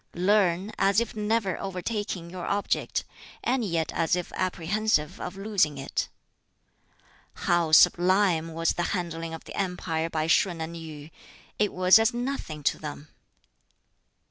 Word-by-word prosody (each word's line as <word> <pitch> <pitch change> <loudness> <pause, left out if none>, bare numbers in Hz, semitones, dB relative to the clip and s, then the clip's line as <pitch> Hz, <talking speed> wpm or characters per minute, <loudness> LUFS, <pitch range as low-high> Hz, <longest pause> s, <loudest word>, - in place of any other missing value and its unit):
"Learn, 190 +1 +2
as 200 +2 +4
if 235 -2 -3
never 210 -3 0
overtaking 195 -2 -4
your 180 -1 -6
object, 200 0 -1 0.4
and 250 0 +1
yet 170 -5 -1
as 165 +1 +1
if 180 -1 -4
apprehensive 185 -2 0
of 180 - -6
losing 195 -8 +1
it. 135 0 -3 1.4
"How 170 -2 +2
sublime 175 0 +4
was 165 0 +1
the - - -2 0.2
handling 165 -2 -4
of 160 - -11
the - - -10
empire 175 -4 -2
by 155 -1 -1
Shun 170 +1 +2
and 160 +1 -5
Yu! 155 -2 -9 0.5
it 210 -1 +2
was 185 +3 +6
as 225 +2 +2
nothing 240 - -4
to - - +1
them! 150 -1 -8
180 Hz, 140 wpm, -27 LUFS, 165-205 Hz, 1.4 s, was